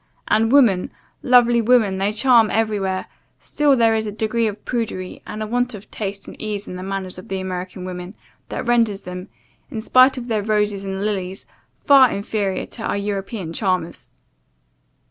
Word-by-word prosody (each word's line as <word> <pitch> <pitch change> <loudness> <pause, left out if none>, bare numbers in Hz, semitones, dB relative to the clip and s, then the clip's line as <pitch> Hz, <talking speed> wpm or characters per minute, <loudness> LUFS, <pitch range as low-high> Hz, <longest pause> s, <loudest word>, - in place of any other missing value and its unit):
And 225 +2 +2
woman, 235 -10 +4 0.3
lovely 240 -2 +5
woman! 220 -5 +3
they 200 +2 +1
charm 230 0 +4
everywhere 205 -4 -1 0.3
still 290 -2 +2
there 230 -2 +4
is 220 -1 -1
a - - -3
degree 220 +2 0
of 210 -1 -6
prudery, 220 -6 -3
and 215 +1 -5
a - - -3
want 245 +1 -1
of 205 +1 -13
taste 200 -2 -5
and - - -9
ease 210 -1 -4
in - - -6
the 180 - -6
manners 190 -1 -4
of 185 - -12
the 190 0 -3
American 185 0 -5
women, 180 +1 -7 0.3
that - - -4
renders 230 -4 +2
them, 180 0 -7 0.4
in 235 -6 -5
spite 255 +4 +5
of 245 -1 -6
their 220 -3 0
roses 210 -1 0
and 195 +1 -3
lilies, 195 -2 -3 0.3
far 270 -3 +6
inferior 200 -1 -2
to 230 - -11
our 220 - -1
European 200 -3 -4
charmers. 185 -4 -2
210 Hz, 175 wpm, -21 LUFS, 190-230 Hz, 0.4 s, far